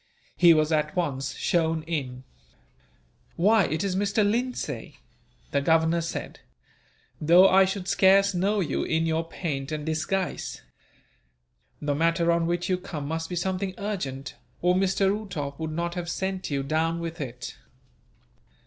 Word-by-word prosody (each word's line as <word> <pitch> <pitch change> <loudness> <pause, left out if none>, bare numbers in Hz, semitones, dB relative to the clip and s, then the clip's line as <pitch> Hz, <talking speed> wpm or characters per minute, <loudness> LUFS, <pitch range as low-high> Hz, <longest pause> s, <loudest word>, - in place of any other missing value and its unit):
He 175 -1 +7
was 155 0 +2
at 150 -1 0
once 140 -6 -2
shown 165 -2 0
in. 135 -6 -4 1.1
"Why, 205 +2 +4
it 155 +3 -2
is 195 -2 -1
Mr. 205 +1 +2
Lindsay!" 245 +4 -3 0.5
the 140 - +1
Governor 160 +3 +3
said, 165 - -5 0.8
"though 175 +5 +7
I 190 0 +6
should 190 -1 -4
scarce 195 +1 +4
know 195 +3 +1
you, 170 - -1
in 160 0 0
your 160 0 0
paint 155 -4 -4
and 150 -1 -3
disguise. 160 +4 -2 1.2
The 145 -1 -1
matter 165 +3 +2
on 170 0 +1
which 175 +1 -1
you 185 -1 0
come 155 -6 -6
must 160 +1 -3
be 180 - -4
something 185 +1 -2
urgent, 160 -10 -4 0.3
or 180 0 +4
Mr. 195 +1 +2
Uhtoff 155 -10 -5
would 160 -1 -3
not 170 +2 -2
have 175 -1 -4
sent 190 +2 -3
you 140 -2 -1
down 160 +4 0
with 165 -1 -5
it." 125 -2 -6
170 Hz, 150 wpm, -26 LUFS, 155-190 Hz, 1.2 s, He